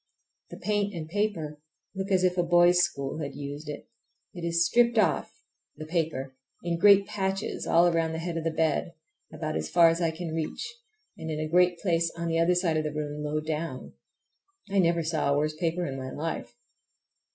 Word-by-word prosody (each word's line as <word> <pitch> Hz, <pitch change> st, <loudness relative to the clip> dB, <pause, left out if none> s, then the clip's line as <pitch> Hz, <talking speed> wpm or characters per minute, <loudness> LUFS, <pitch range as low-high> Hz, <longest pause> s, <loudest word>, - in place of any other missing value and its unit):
The -, -, -9 dB
paint 205 Hz, -2 st, -1 dB
and 160 Hz, -2 st, -5 dB
paper 165 Hz, -6 st, -2 dB, 0.3 s
look 190 Hz, +1 st, -4 dB
as 185 Hz, -2 st, +3 dB
if 180 Hz, -1 st, +3 dB
a 180 Hz, -, +2 dB
boys' 175 Hz, +1 st, +5 dB
school 140 Hz, -3 st, -2 dB
had 140 Hz, -3 st, -5 dB
used 145 Hz, +1 st, -6 dB
it. 145 Hz, -, -7 dB, 0.5 s
It 175 Hz, -3 st, -8 dB
is 170 Hz, 0 st, +2 dB
stripped 235 Hz, +5 st, +3 dB
off—the 155 Hz, -6 st, -2 dB
paper—in 155 Hz, 0 st, -3 dB
great 200 Hz, +1 st, +7 dB
patches 195 Hz, -1 st, -3 dB
all 170 Hz, +1 st, +5 dB
around 165 Hz, -1 st, +1 dB
the -, -, -3 dB
head 170 Hz, +1 st, -4 dB
of 165 Hz, -, -2 dB
my 165 Hz, -, +1 dB
bed, 160 Hz, +1 st, 0 dB, 0.4 s
about -, -, -4 dB
as 80 Hz, 0 st, -2 dB
far 170 Hz, -1 st, +6 dB
as 165 Hz, +2 st, -1 dB
I 165 Hz, -, +2 dB
can 160 Hz, 0 st, -5 dB
reach, 165 Hz, -, -4 dB, 0.5 s
and 160 Hz, -, -5 dB
in 155 Hz, -1 st, -3 dB
a 155 Hz, -, -2 dB
great 175 Hz, +2 st, +3 dB
place 170 Hz, -3 st, 0 dB
on 170 Hz, 0 st, -2 dB
the 165 Hz, 0 st, +1 dB
other 170 Hz, +2 st, +3 dB
side 175 Hz, -3 st, +1 dB
of 155 Hz, -, 0 dB
the 150 Hz, -, -2 dB
room 150 Hz, 0 st, -4 dB
low 150 Hz, +1 st, -1 dB
down. 155 Hz, -3 st, -4 dB, 0.8 s
I 200 Hz, -, +2 dB
never 170 Hz, -2 st, +3 dB
saw 155 Hz, -3 st, 0 dB
a 140 Hz, -, +2 dB
worse 155 Hz, +1 st, 0 dB
paper 170 Hz, +2 st, -1 dB
in 135 Hz, -3 st, -4 dB
my 130 Hz, 0 st, -5 dB
life. 145 Hz, -6 st, -5 dB
165 Hz, 195 wpm, -28 LUFS, 155-180 Hz, 0.8 s, great